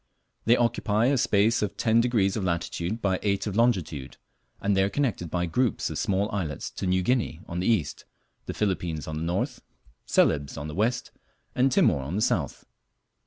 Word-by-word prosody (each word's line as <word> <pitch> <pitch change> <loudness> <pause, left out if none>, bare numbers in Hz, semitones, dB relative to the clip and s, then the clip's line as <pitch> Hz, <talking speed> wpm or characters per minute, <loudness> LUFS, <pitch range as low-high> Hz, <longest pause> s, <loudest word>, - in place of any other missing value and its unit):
They 120 +2 +5
occupy 115 -2 +1
a 135 +2 +3
space 110 +1 +3
of 105 -2 -2
ten 115 0 +3
degrees 110 -5 +1
of 105 - -2
latitude 85 +4 -2
by 95 -2 +1
eight 100 -1 0
of 105 -3 -3
longitude, 95 - 0 0.4
and 100 0 +1
they 95 - +3
are 95 - +2
connected 115 - -1
by 90 +1 -1
groups 120 +7 0
of - - -3
small 100 +1 +1
islets 85 -9 -3
to 95 - -4
New 90 0 +2
Guinea 120 -7 0
on 85 - -4
the 90 - -1
east, 105 - 0 0.4
the - - -3
Philippines 90 -7 -2
on 80 0 -4
the - - -4
north, 85 +2 -2 0.5
Celebes 70 -2 +2
on 75 - -5
the 75 - -6
west, 115 +7 -1 0.4
and 130 +2 +2
Timor 105 - +3
on 70 +7 -4
the 105 - 0
south. - - -1
100 Hz, 190 wpm, -26 LUFS, 85-115 Hz, 0.5 s, They